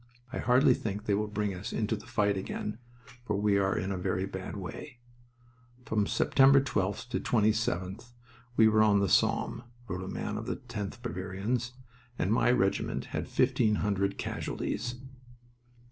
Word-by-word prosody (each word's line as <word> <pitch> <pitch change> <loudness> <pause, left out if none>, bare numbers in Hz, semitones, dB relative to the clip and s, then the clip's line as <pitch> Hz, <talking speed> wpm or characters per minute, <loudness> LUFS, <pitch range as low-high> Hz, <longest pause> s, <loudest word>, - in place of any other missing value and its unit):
I - - -2
hardly 125 +2 +5
think 105 -2 -4
they 105 - +1
will 105 +2 0
bring 105 -1 -2
us 90 - -6
into - - 0
the - - -11
fight 100 -1 +1
again, 105 +3 -4 0.4
for 105 -4 -1
we 100 -1 +3
are 95 0 +1
in 95 +2 -2
a 95 - -2
very 90 +1 -1
bad 95 +1 -6
way." 110 +8 -7 0.9
"From 105 -2 +1
September 135 +1 +5
12th 105 -3 -1
to - - -1
27th 110 -1 0 0.5
we 110 - +7
were 110 0 +4
on 105 -2 +5
the 100 - +2
Somme," - - +2 0.3
wrote 90 -1 -4
a - - -6
man 105 +2 -3
of 115 - -7
the - - -1
10th 120 -2 -6
Bavarians, 110 +4 -2 0.4
"and 100 - +1
my 115 +1 +3
regiment 120 -6 +1
had - - -2
fifteen 105 -1 +2
hundred 100 -1 0
casualties." 120 +4 -3
105 Hz, 160 wpm, -30 LUFS, 95-115 Hz, 0.9 s, we